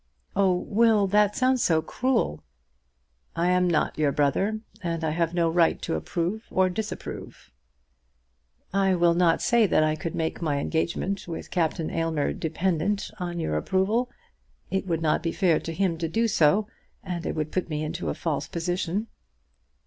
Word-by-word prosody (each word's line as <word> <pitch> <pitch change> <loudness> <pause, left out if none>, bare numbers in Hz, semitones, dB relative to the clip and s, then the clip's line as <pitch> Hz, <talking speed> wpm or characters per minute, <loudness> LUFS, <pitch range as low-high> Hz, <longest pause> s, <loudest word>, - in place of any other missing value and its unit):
"Oh, 190 -2 +3
Will; 220 -1 +4
that 205 +1 +3
sounds 255 -1 +2
so 160 -2 +2
cruel!" 245 - -1 0.9
"I 170 +2 +2
am 180 0 +3
not 160 -2 0
your 150 -2 +3
brother, 195 +10 +1 0.2
and 170 -2 -3
I 160 - +1
have 165 +1 0
no 170 -1 +3
right 165 0 +3
to - - -2
approve 170 - -2
or 185 0 +2
disapprove." 215 +4 -6 1.2
"I 195 -1 +3
will 170 -1 +4
not 170 -1 +3
say 235 -3 +4
that 155 - +3
I 155 0 +1
could 165 +1 -5
make 160 +1 -2
my 150 -4 0
engagement 170 +6 -2
with 165 - -6
Captain 165 -1 0
Aylmer 165 -3 0
dependent 180 +4 -1
on 175 -1 -3
your 75 - -1
approval. 200 - +1 0.6
It 190 0 -1
would 165 -2 -1
not 155 0 +2
be 165 0 -1
fair 175 -4 +2
to 165 - -6
him 170 -1 0
to 165 - -1
do 225 +6 +1
so, 200 +1 +3 0.4
and 180 -3 -4
it - - -3
would 155 -1 -2
put 185 -2 -2
me 150 -1 -2
into 165 +3 -3
a - - -2
false 150 -3 -2
position." 175 +4 -2
175 Hz, 170 wpm, -26 LUFS, 160-195 Hz, 1.2 s, Will